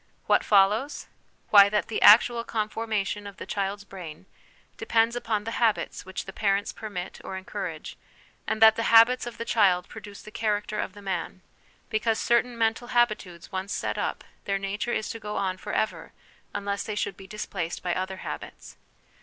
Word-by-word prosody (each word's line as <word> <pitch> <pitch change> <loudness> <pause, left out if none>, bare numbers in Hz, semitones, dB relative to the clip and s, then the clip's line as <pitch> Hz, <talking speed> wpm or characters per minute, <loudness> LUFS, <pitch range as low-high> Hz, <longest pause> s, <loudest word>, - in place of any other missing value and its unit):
What - - +3
follows? 210 +8 +3 0.5
Why, 200 -1 +9
that 210 0 0
the 220 - -3
actual 235 +2 +7
conformation 215 -2 -2
of 200 0 -10
the - - -7
child's 200 0 -3
brain 185 -4 -10 0.5
depends 230 +1 +1
upon 220 -3 -1
the 225 +2 -4
habits 220 -4 0
which 190 - -5
the 195 - -8
parents 200 0 0
permit 195 -5 -7
or 190 - -5
encourage; 185 -4 -6 0.5
and 220 - +2
that 220 0 +8
the 230 - -1
habits 230 +2 +6
of 240 - -7
the 230 - -4
child 190 -7 +3
produce 205 -1 -11
the 215 - -11
character 210 -1 -1
of 185 - -3
the 205 0 -13
man, 185 -1 -4 0.5
because 220 +1 +1
certain 240 0 +1
mental 225 +1 0
habitudes 215 -9 0
once 190 +1 -3
set - - -2
up, - - -2 0.2
their 195 0 0
nature 195 +4 -3
is 220 - -1
to 230 - -7
go 210 -1 -6
on 185 -1 -1
for - - -7
ever 215 - -2 0.4
unless 200 0 -3
they 215 - -4
should 200 - -2
be 190 +1 -13
displaced 190 -4 -5
by 175 -1 0
other 190 +1 -3
habits. - - -8
205 Hz, 180 wpm, -26 LUFS, 195-225 Hz, 0.5 s, Why